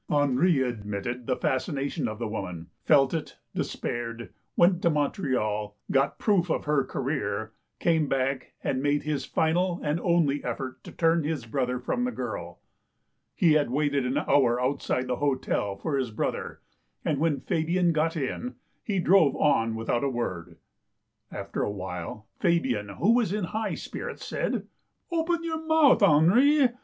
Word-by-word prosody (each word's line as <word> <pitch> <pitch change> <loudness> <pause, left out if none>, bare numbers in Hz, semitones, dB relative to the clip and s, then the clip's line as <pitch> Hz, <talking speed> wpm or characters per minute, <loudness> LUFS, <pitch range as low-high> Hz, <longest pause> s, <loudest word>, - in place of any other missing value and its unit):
Henri 145 +1 +3
admitted 120 +1 -4
the 130 - +1
fascination 140 +1 -1
of 110 -1 -5
the 115 0 -3
woman, 90 -6 -6
felt 135 -3 +5
it, 160 - -4 0.2
despaired, 120 0 -4 0.2
went 175 +1 +4
to 170 - +3
Montreal, 125 - -1
got 135 +1 +2
proof 185 -5 +2
of - - -1
her 150 -2 +2
career, 110 -6 -3 0.3
came 160 -3 +2
back, 135 0 -1
and 130 - 0
made 145 0 +1
his 145 -3 -2
final 175 +3 +1
and 150 +2 0
only 165 -5 +2
effort 130 -1 -5
to - - -8
turn 165 -1 +2
his 150 -5 -2
brother 125 +1 -1
from 245 - -1
the 250 - 0
girl. - - -5 0.8
He 175 -6 +4
had 150 -5 +2
waited 140 +1 +1
an 130 - 0
hour 125 -4 +3
outside 130 0 0
the 125 -1 -2
hotel 130 -8 0
for 145 +8 -2
his 130 -3 -1
brother, 110 - -3 0.4
and 145 - 0
when 155 -2 +1
Fabian 170 +2 +1
got 160 +2 +1
in, 195 - -3 0.3
he 205 -3 -1
drove 175 -5 +4
on 115 -7 +2
without 115 +2 -1
a 140 - +1
word. 120 -9 -4 0.7
After - - -4
a - - 0
while, 95 +1 -6
Fabian, 130 - +1
who 185 - +2
was 235 -6 +2
in 210 0 -1
high 215 +4 -2
spirits, - - -6
said: - - -2 0.2
" - - -45
Open 335 0 0
your 320 -1 -3
mouth, 315 -6 +5
Henri. 235 - +5
145 Hz, 160 wpm, -27 LUFS, 125-170 Hz, 0.8 s, felt